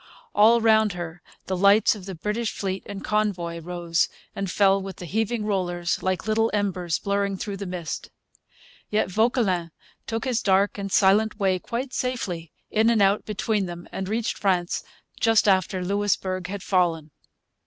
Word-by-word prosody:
All 230 +3 +6
round 220 -2 +4
her 175 -1 -6 0.2
the 190 - -2
lights 200 +3 +5
of 200 -3 -10
the 190 - -5
British 210 +6 -2
fleet 190 -1 -2
and 200 -1 -7
convoy 190 -6 -1
rose 170 0 0 0.3
and 195 -1 -3
fell 195 +1 +3
with 190 -1 -7
the 180 - -8
heaving 220 +4 -1
rollers, 175 -4 -1
like 185 0 -1
little 225 +1 +2
embers 185 -5 -1
blurring 200 -1 -1
through 200 +1 -4
the 200 0 -5
mist. 175 -3 -5 0.8
Yet 210 -3 0
Vauquelin 205 -5 +1 0.4
took 225 0 -2
his 245 -3 0
dark 200 +1 +2
and 195 -1 -4
silent 210 +3 +3
way 190 -2 +2
quite 250 +7 -4
safely, 185 -11 -3 0.2
in 220 +1 +3
and 230 -2 +3
out 200 +1 +3
between 210 -1 -1
them, 175 0 -8
and 190 0 -4
reached 225 +1 -1
France 180 -3 0 0.4
just 225 -1 +4
after 185 -1 +2
Louisbourg 190 -2 -1
had 200 +1 -6
fallen. 165 -5 +1
195 Hz, 165 wpm, -25 LUFS, 180-215 Hz, 0.8 s, All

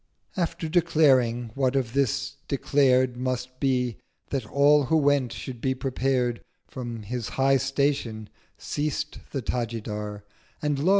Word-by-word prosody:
After 170 -3 -2
declaring 135 -8 +3
what 135 0 +1
of 125 -4 0
this 135 +1 0
declared 130 -3 +2
Must 130 0 -3
be, 125 -4 +1 0.3
that 130 -6 -2
all 145 +3 +4
who 160 +5 +3
went 140 -5 +2
should 120 -1 -7
be 130 0 +1
prepared, 130 -2 0 0.3
From 120 -4 -6
his 120 +1 -4
high 135 0 +4
Station 135 -5 -1 0.3
ceased 150 +1 -3
the 135 -4 -4
Tajidar— 105 -4 -3 0.4
And 150 -2 0
lo! 160 +6 +2
130 Hz, 130 wpm, -26 LUFS, 120-140 Hz, 0.4 s, all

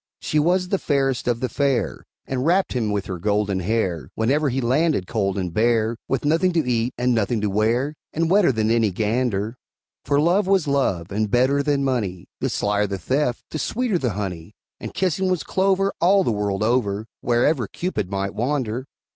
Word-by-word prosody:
She 150 - 0
was 180 +4 +2
the 195 - +1
fairest 135 -4 0
of 120 -1 0
the 130 - +1
fair, 130 - -1 0.2
And 130 -1 -2
wrapt 180 +5 +2
him 125 -3 0
round 105 - -1
with 100 - -2
her 90 -2 -5
golden 100 0 0
hair, 90 - -1
Whenever 140 +6 +1
he 130 +1 -1
landed 135 - +1
cold 100 -2 -1
and 90 -3 -3
bare, 115 +1 +2
With 135 +1 -1
nothing 165 +5 +2
to 165 -6 +1
eat 120 0 +1
and 125 +1 +1
nothing 115 0 0
to 105 -2 0
wear, 115 +8 +1 0.2
And 165 +1 0
wetter 185 -3 +4
than 110 -2 0
any 115 -2 +3
gander; 110 +2 -1 0.5
For 140 +1 +1
Love 180 +6 +2
was 190 -5 +2
Love, 100 -12 0
and 105 +1 -1
better 130 +5 +3
than 140 -1 +1
money; 105 -10 -2
The - - -1
slyer 105 0 0
the 100 0 -3
theft, 125 - -1
the 155 - -3
sweeter 230 -3 0
the 125 -7 -1
honey; 95 -1 -5 0.2
And - - -6
kissing 190 0 0
was 180 -4 0
clover, 195 +1 +1
all 195 +3 +5
the 120 - 0
world 105 -1 -1
over, 110 -3 0 0.2
Wherever 120 +1 +2
Cupid 175 - -3
might 100 0 -2
wander. 125 +1 -2
120 Hz, 195 wpm, -22 LUFS, 105-150 Hz, 0.5 s, all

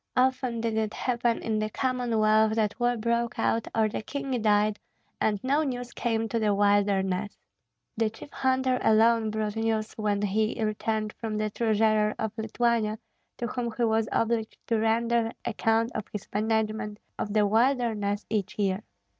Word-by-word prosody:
Often 255 -2 +1
did 225 -1 -1
it 220 -1 -1
happen 240 -2 0
in 220 -1 0
the 215 0 -1
Commonwealth 220 -4 +2
that 215 -1 0
war 240 0 +2
broke 235 +1 -1
out 225 0 0
or 220 -1 +3
the 215 - -4
king 270 0 -3
died 210 0 +2 0.4
and 210 -2 +1
no 280 +4 +2
news 245 -4 -3
came 225 -1 -1
to 230 - 0
the 210 -2 +2
wilderness; 200 -1 +1 0.6
the 225 -1 +1
chief 225 +6 -12
hunter 260 -1 +1
alone 225 0 +4
brought 215 -1 -2
news 225 -1 -1
when 210 -2 0
he 215 +2 0
returned 215 0 -1
from 220 -2 -3
the 215 0 -1
treasurer 215 -1 +2
of 220 -1 -3
Lithuania, 220 -1 0 0.4
to 240 - -3
whom 240 0 -3
he 240 - +1
was 220 -1 +2
obliged 230 -1 0
to 230 -2 +1
render 230 +1 +1
account 225 +1 +1
of 215 - -3
his 210 - -6
management 215 0 -1 0.2
of 205 - -2
the 210 -1 +4
wilderness 220 -3 +1
each 210 -2 -2
year. 195 -1 0
220 Hz, 165 wpm, -27 LUFS, 215-235 Hz, 0.6 s, alone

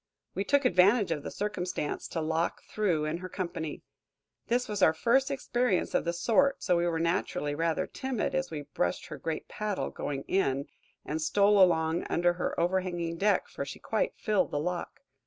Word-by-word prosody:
We 195 - -1
took 280 +5 +2
advantage 200 0 +4
of 155 -3 -1
the - - -5
circumstance 180 -7 -3
to 165 - -3
lock 160 +2 -1
through 180 -8 0
in 155 +2 -1
her 185 0 -7
company. 170 -4 -4 0.6
This 245 +1 +1
was 210 -2 -3
our 160 -3 +5
first 265 - +3
experience 250 -6 0
of - - +1
the 170 - +1
sort, 265 +10 +2
so 180 - +3
we 170 0 +1
were 165 -1 0
naturally 165 -3 0
rather 165 +1 0
timid 260 -5 -3
as 175 0 0
we 150 -2 -5
brushed 115 -11 -2
her - - -7
great 160 -1 -4
paddle, 210 -2 -3
going 140 -1 -4
in, 140 -8 0 0.4
and 155 +1 -3
stole 200 +5 +4
along 165 -2 +3
under 175 +1 +2
her 175 - -2
overhanging 175 -1 0
deck, 205 +3 +2
for - - -5
she - - -7
quite - - -1
filled 210 -3 +1
the 145 - -1
lock. 175 +3 -4
180 Hz, 185 wpm, -29 LUFS, 160-210 Hz, 0.6 s, our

